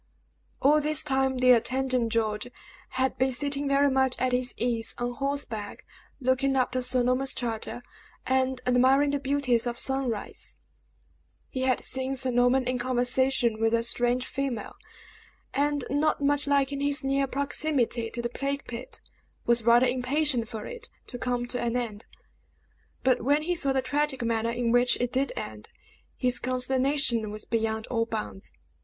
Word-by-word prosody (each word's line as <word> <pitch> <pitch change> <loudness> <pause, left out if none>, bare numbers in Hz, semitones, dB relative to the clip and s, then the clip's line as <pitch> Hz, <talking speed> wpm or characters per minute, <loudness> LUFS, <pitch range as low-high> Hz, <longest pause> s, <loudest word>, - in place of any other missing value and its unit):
All 300 +3 +5
this 305 0 +3
time, 265 -2 +1
the 255 0 +5
attendant, 250 0 +1
George, 215 -1 -1 0.5
had 260 -1 0
been 260 +1 +2
sitting, 280 +2 -1
very 280 0 +3
much 265 -1 +2
at 255 0 0
his 250 0 0
ease, 230 -2 0
on 245 0 -2
horseback, 250 -6 -3 0.3
looking 265 +1 +1
after 255 0 +1
Sir 250 0 +2
Norman's 255 +2 +1
charger 240 0 -4 0.4
and 260 0 0
admiring 260 +3 +4
the 285 - -1
beauties 265 -4 0
of 240 0 -3
sunrise. 265 -6 -2 0.9
He 260 - -4
had 260 -1 +1
seen 265 +1 -2
Sir 260 -1 0
Norman 245 +1 +3
in 250 0 -1
conversation 250 -1 +1
with 225 +1 +2
a 230 - +1
strange 245 +1 +1
female, 270 -5 -4 0.8
and 290 0 0
not 295 +3 +1
much 285 0 +1
liking 280 0 +1
his 285 0 0
near 275 0 +1
proximity 270 -4 0
to 235 +1 -6
the 235 - -1
plague 275 +3 -3
pit, 240 +1 -7 0.4
was 235 -1 +3
rather 235 +2 +6
impatient 255 0 +1
for 220 -1 -7
it 480 -3 -6 0.2
to 245 - -8
come 245 -1 -1
to 245 0 -3
an 240 +1 0
end; 225 -4 -4 1.0
but 255 -1 +3
when 290 +5 +2
he 355 +3 0
saw 280 -5 +1
the 265 -1 0
tragic 285 0 -1
manner 230 0 0
in 235 0 -1
which 245 +1 +3
it 245 0 -1
did 270 +2 +1
end, - - -6 0.5
his 250 -1 +1
consternation 255 -2 +1
was 210 0 -7
beyond 220 -1 -1
all 230 -2 0
bounds. 215 -3 -5
255 Hz, 160 wpm, -27 LUFS, 240-275 Hz, 1.0 s, rather